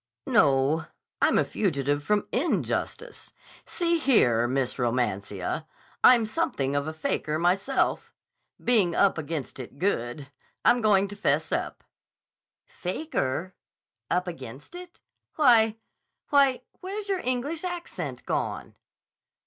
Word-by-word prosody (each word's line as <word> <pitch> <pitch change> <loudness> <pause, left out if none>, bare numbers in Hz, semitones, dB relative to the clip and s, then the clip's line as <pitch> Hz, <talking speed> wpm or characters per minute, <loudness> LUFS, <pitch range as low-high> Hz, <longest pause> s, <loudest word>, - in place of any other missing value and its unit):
"No. 140 +3 +3 0.3
I'm - - +4
a - - +4
fugitive 145 -7 -1
from 210 +4 0
injustice. 350 - -2 0.3
See 340 -1 0
here, 120 - +3
Miss 130 0 -1
Romancia, 120 - -2 0.4
I'm 240 -3 +7
something 140 -9 -1
of 145 +1 -1
a - - -2
faker 155 -1 -1
myself. 195 +10 0 0.5
Being 205 -9 +2
up 195 -4 +3
against 155 -3 -5
it 130 +2 -9
good, 140 -6 -2 0.3
I'm 245 - +5
going 200 -2 +4
to 205 - -8
'fess 200 - 0
up. - - -3 0.8
"'Faker'? 185 - -3 0.6
'Up 180 +1 0
against 135 - -8
it'? 355 0 -11 0.4
Why—why, 250 +2 +2 0.2
where's 400 +3 -5
your 390 -2 0
English 270 +6 -2
accent 355 -1 -5
gone?" - - -3
185 Hz, 110 wpm, -26 LUFS, -, 0.8 s, I'm